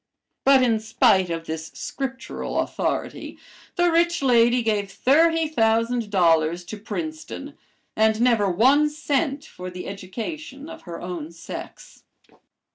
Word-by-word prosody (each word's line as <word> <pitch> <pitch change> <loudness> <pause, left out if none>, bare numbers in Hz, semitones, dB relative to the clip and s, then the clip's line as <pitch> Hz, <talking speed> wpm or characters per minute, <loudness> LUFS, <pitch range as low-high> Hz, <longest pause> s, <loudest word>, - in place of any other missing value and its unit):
But 270 -1 +6
in 230 -3 +2
spite 195 -4 +3
of 165 -1 -4
this 160 0 -5
Scriptural 265 -1 -4
authority, - - -3 0.4
the 350 -1 +3
rich 340 -1 +2
lady 240 -1 +4
gave 210 -3 0
thirty 325 +7 +3
thousand 230 -4 +1
dollars 170 -3 +2
to 215 - -7
Princeton 315 +8 -6 0.4
and 220 0 +3
never 230 -5 +3
one 265 +11 +4
cent 290 -1 -1
for 180 0 -8
the 180 0 -8
education 265 - -7
of 325 -1 -10
her 170 - -6
own 175 -3 -6
sex. 170 0 -10
230 Hz, 125 wpm, -23 LUFS, 185-285 Hz, 0.4 s, But